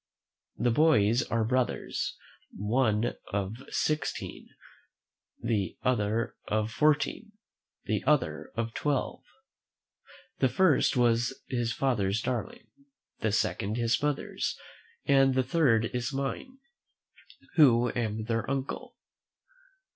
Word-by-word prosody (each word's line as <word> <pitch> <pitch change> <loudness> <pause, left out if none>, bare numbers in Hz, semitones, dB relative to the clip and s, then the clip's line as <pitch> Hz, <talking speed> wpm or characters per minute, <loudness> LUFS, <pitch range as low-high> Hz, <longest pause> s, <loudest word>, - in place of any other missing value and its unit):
The 120 - +2
boys 120 -5 +4
are 115 -6 0
brothers, 125 +2 -1 0.4
one 110 +1 +1 0.2
of 100 +2 -2
sixteen, 155 -2 -2 1.0
the 110 -5 -1
other 115 -2 0
of 110 +1 0
fourteen, 155 - +1 0.5
the - - -1
other 80 - +1
of 115 0 -2
twelve. 145 -3 -1 1.2
The 130 - +3
first 150 -1 +3
was 120 +1 +2
his 120 -3 -1
father's 110 -6 0
darling, 180 - -4 0.5
the 110 - 0
second 105 +1 0
his 115 -1 +1
mother's, 145 -1 -2 0.5
and 135 -1 +4
the 130 - +3
third 125 -5 +3
is 125 0 -2
mine, 140 - -4 1.0
who 125 -6 +5
am 110 -2 -2
their 115 +2 -2
uncle. 135 0 -4
120 Hz, 100 wpm, -29 LUFS, 110-135 Hz, 1.2 s, who